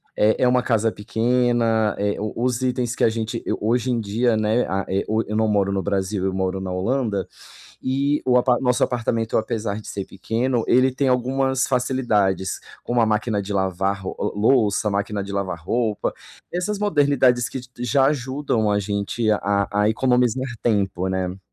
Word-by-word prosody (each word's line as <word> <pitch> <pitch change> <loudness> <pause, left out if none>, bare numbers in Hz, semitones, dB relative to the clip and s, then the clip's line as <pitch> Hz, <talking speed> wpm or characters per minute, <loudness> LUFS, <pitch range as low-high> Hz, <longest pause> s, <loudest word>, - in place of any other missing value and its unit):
é 110 +4 +2
é - - +5
uma 125 0 +3
casa 115 -2 +1
pequena, 115 0 +1
eh, 100 0 -1
o 105 0 -3
os 125 0 0
itens 125 -2 -1
que - - -1
a - - +5
gente 115 +1 -3
eu, - - -1
hoje 120 +4 +1
em 120 - 0
dia, 110 +3 +1
né, 110 +3 +1
a 95 +1 -2
e 95 +1 0
o 110 +1 +1
eu 105 - -4
não 110 0 +2
moro 100 -2 +1
no 95 -1 0
Brasil, 95 0 -1
eu 95 - 0
moro 95 0 -1
na 95 -1 -4
Holanda, 105 +1 -1 0.5
e 140 +3 0
o 125 -1 +4
apa 125 -1 +3
nosso 125 -2 +2
apartamento, 115 -2 0
apesar 110 -1 -2
de - - -13
ser 100 -1 -4
pequeno, 115 +4 -1
ele 130 +1 +4
tem 135 +1 0
algumas 130 +1 +1
facilidades, 110 -8 0 0.2
como 120 0 0
a - - +4
máquina 105 -1 0
de 100 +1 -5
lavar 95 +1 0
ro 95 - -5
o 105 0 -3
louça, 110 -2 +3
máquina 100 0 -2
de 100 - -7
lavar 95 -4 -3
roupa, 110 +4 -1 0.4
essas 190 +4 -2
modernidades 140 -10 +3
que 130 - -5
j 125 - -15
já 130 +3 +2
ajudam 130 -6 0
a 100 - +2
gente 100 +3 -2
a 105 - +3
a 100 +1 0
a 105 - +3
economizar 125 +2 +1 0.2
tempo, 100 -5 0
né. 95 0 -2
110 Hz, 190 wpm, -22 LUFS, 100-125 Hz, 0.5 s, é